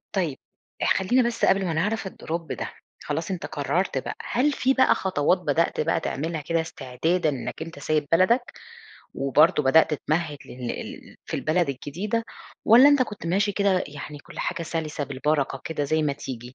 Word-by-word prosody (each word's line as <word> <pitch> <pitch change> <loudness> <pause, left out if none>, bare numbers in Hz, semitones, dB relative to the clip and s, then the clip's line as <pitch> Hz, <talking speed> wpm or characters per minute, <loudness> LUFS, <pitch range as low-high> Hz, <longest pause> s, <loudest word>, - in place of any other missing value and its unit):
طيب 165 -8 0 0.5
اح - - +4
خلّينا 235 +6 +2
بس 235 - 0
قبل 195 0 +3
ما 165 - -1
نعرف 205 +5 -1
الdrop 170 -2 -4
ده، - - -4 0.3
خلاص 160 +6 -3
أنت 180 - -4
قرّرت 145 +3 -1
بقى - - -3
هل 275 +5 +1
في 265 -1 +2
بقى 260 -1 +4
خطوات 180 -1 +1
بدأت 165 -1 0
بقى - - +1
تعملها 160 +2 -3
كده 165 +3 0
استعدادًا 160 +3 -1
إنك 140 +3 -5
أنت 165 -3 -7
سايب 150 0 0
بلدك، 230 +9 +3 0.6
وبرضه 150 +4 +3
بدأت 155 +3 +4
تمهد 155 0 -2
لل 125 -1 -6
ال - - -8
في - - -5
البلد 165 0 +1
الجديدة، 190 - -3 0.4
والَّا 245 +6 +8
أنت 285 -3 +5
كنت 210 -7 -6
ماشي 200 +4 +1
كده 195 -2 +2
يعني 145 0 -8
كلّ - - -13
حاجة 180 -2 -2
سلسة 160 -3 -3
بالبركة 140 0 -1
كده 150 -3 -2
زي 155 +2 +1
ما 145 -2 +1
تيجي؟ 130 -4 -6
165 Hz, 175 wpm, -25 LUFS, 145-190 Hz, 0.6 s, والَّا